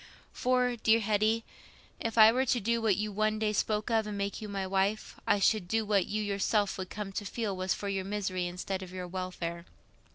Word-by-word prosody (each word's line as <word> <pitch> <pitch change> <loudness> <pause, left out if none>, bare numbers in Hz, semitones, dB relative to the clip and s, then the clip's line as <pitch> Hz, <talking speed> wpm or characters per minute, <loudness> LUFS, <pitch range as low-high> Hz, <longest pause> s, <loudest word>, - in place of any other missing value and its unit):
For, 250 -1 +1
dear 225 0 +4
Hetty, 215 +1 +1 0.6
if 230 0 -3
I 220 0 +9
were 260 +3 +1
to 245 - +2
do 230 +2 0
what 215 -4 +3
you 210 +1 -2
one 215 +1 +1
day 215 -1 0
spoke 210 +2 0
of, 220 -1 +2
and 210 -1 -4
make 200 +2 -3
you 215 - -6
my 195 -1 -2
wife, 195 +3 -1
I - - +4
should 200 -1 +2
do 220 +3 0
what 205 -3 +2
you 215 +1 -1
yourself 205 0 0
would 185 - -4
come 205 -2 -5
to 200 - -3
feel 205 0 -3
was 185 0 0
for 200 - -5
your 195 -1 -1
misery 190 -2 -2
instead 185 +2 -4
of 185 -1 -8
your 180 -1 -5
welfare. 175 -2 -5
205 Hz, 220 wpm, -30 LUFS, 190-220 Hz, 0.6 s, I